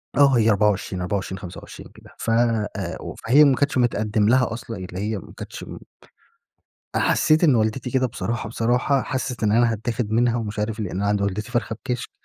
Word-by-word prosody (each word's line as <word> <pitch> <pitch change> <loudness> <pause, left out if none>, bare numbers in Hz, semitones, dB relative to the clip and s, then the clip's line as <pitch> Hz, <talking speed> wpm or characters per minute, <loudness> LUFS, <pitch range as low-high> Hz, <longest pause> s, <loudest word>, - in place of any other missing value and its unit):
آه 140 -2 +5
هي 115 -1 +4
24، 100 -3 +1
24، 95 +1 -3
25 90 -3 -10
كده. - - -16
فأ 115 -2 +1 0.3
و - - -7
فهي 140 +6 +5
ما 140 -3 +5
كانتش 140 -1 0
متقدم 110 -3 +1
لها 125 -2 +3
أصلًا، 115 -1 -7
اللي 90 -1 -7
هي 105 +2 -2
ما 95 - -11
كانتش - - -8
امم - - -9 1.2
أ - - +3
حسّيت 155 +2 +3
إن 145 -6 +5
والدتي 110 +3 0
كده 130 +1 +2
بصراحة، 115 -1 -4
بصراحة 125 +4 +1
حسّت 130 -3 -4
إن 105 -1 +2
أنا 115 0 +3
هتاخد 110 0 -3
منها 120 +1 +2
ومش 110 -2 -4
عارف 110 +1 -2
لأن 95 -4 -4
أنا 100 +2 -1
عند 105 0 +1
والدتي 100 +4 -2
فرخة 120 -3 -1
بِكشك 125 -2 -3
115 Hz, 190 wpm, -23 LUFS, 105-125 Hz, 1.2 s, آه